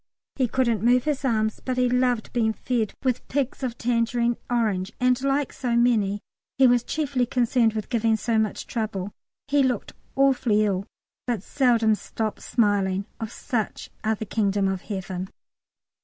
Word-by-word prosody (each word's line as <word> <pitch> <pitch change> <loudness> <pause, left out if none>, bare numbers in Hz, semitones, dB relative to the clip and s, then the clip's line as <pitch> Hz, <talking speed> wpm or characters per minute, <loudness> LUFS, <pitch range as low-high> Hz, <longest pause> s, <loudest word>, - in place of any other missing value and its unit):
He 260 -2 +1
couldn't 235 -4 +1
move 245 +2 +4
his 295 -2 -1
arms, 220 -4 0
but 255 -1 -2
he 250 0 +3
loved 250 -2 +1
being 220 -2 +2
fed 225 -3 -2
with 255 -2 -1
pigs 275 -1 -2
of 245 -3 -3
tangerine 235 0 +1
orange, 215 -6 0
and, 250 0 +2
like 275 0 0
so 245 -3 -1
many, 215 -4 +2 0.4
he 270 - +6
was 245 -1 +4
chiefly 275 -4 -1
concerned 240 -2 +2
with 215 -1 -4
"giving 225 -2 +2
so 225 0 +1
much 215 -2 -1
trouble." 205 -4 -3 0.3
He 285 0 +3
looked 255 -5 0 0.2
awfully 250 -6 +3
ill, 195 -1 -1 0.4
but 235 -6 -1
seldom 235 -5 +3
stopped 215 +1 -3
smiling. 200 -4 +1
Of 225 -2 -4
such 235 -7 -3
are 220 0 +1
the 220 - -5
Kingdom 200 -2 +1
of 190 -1 -2
Heaven. 190 -2 -5
235 Hz, 160 wpm, -25 LUFS, 215-250 Hz, 0.4 s, he